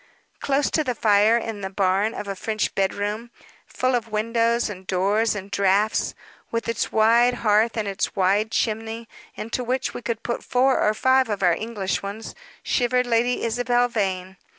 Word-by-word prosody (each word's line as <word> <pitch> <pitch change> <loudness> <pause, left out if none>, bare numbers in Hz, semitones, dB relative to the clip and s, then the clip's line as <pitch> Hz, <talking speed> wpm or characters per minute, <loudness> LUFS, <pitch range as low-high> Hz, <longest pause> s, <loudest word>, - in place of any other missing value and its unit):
Close 280 0 0
to 310 - +1
the 250 -4 -2
fire 215 +1 +4
in 225 -3 -5
the 190 - -4
barn 195 +3 +1
of 210 - -6
a 195 - -3
French 215 +2 -2
bedroom, 205 +4 -2 0.4
full 255 0 -1
of 235 -2 0
windows, 230 +2 +1
and 190 -3 -9
doors, 205 +4 +1
and 200 0 -7
draughts, 200 +2 +1 0.3
with 230 0 -3
its 230 -2 -2
wide 235 +3 +4
hearth 215 +2 +3
and 215 -2 -1
its 195 -1 -2
wide 200 +3 +2
chimney, 225 +1 -2 0.3
into 230 +3 -4
which 255 +2 -2
we - - -6
could 230 0 -4
put 235 - -3
four 260 +1 +2
or 210 +1 +2
five 260 +2 +3
of 205 -2 -2
our 175 -1 +5
English 210 -2 -3
ones, 200 +3 -7 0.3
shivered 250 0 +1
Lady 240 +1 +1
Isabel 245 +1 +1
Vane. 190 -4 -3
220 Hz, 175 wpm, -23 LUFS, 200-235 Hz, 0.4 s, our